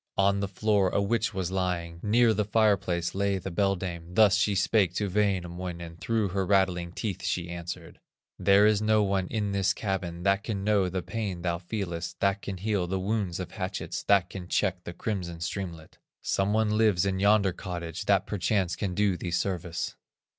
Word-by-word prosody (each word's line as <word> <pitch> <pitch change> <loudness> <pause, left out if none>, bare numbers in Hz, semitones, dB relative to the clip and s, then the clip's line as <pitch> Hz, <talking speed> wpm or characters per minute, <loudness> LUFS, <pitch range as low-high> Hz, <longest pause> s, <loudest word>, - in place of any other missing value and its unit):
On 100 0 +3
the 100 - -1
floor 100 0 +2
a - - 0
witch 115 +3 +1
was 95 -3 -3
lying, 90 -3 -2
Near 115 +2 +4
the 105 0 +1
fire 105 0 +4
place 85 -2 -2
lay 100 0 +1
the 95 0 -5
beldame, 90 -2 -2
Thus 105 -1 +6
she 105 -1 +2
spake 95 -2 +2
to 105 - 0
Wainamoinen, 90 -4 -2
Through 110 +1 0
her 95 +1 -1
rattling 90 -3 +1
teeth 100 +1 -4
she 85 -1 -2
answered: 85 0 -7 0.4
"There 100 +2 +5
is 105 -1 +3
no 110 0 +3
one 95 -2 0
in 105 -1 -2
this 100 -1 +1
cabin 90 -4 -3
That 100 +1 +2
can 100 -4 -3
know 100 -3 +2
the 90 0 -3
pain 100 -6 -4
thou 85 -1 -1
feelest, 85 -3 -4
That 100 0 +1
can 100 -2 -5
heal 100 -2 -1
the 95 +1 -1
wounds 95 -2 -1
of 90 - -5
hatchets, 95 -2 -4
That 100 -3 +3
can 90 -3 -7
check 95 -2 0
the 85 - -6
crimson 90 -3 -4
streamlet; 85 -2 -5 0.2
Some 95 +1 +1
one 110 0 +2
lives 105 -4 +3
in 95 -1 0
yonder 100 -1 +4
cottage, 85 -2 -5
That 95 -2 +3
perchance 95 -3 0
can 95 -4 -3
do 105 -2 +2
thee 85 - -4
service." 90 -1 -2
95 Hz, 190 wpm, -28 LUFS, 90-105 Hz, 0.4 s, Thus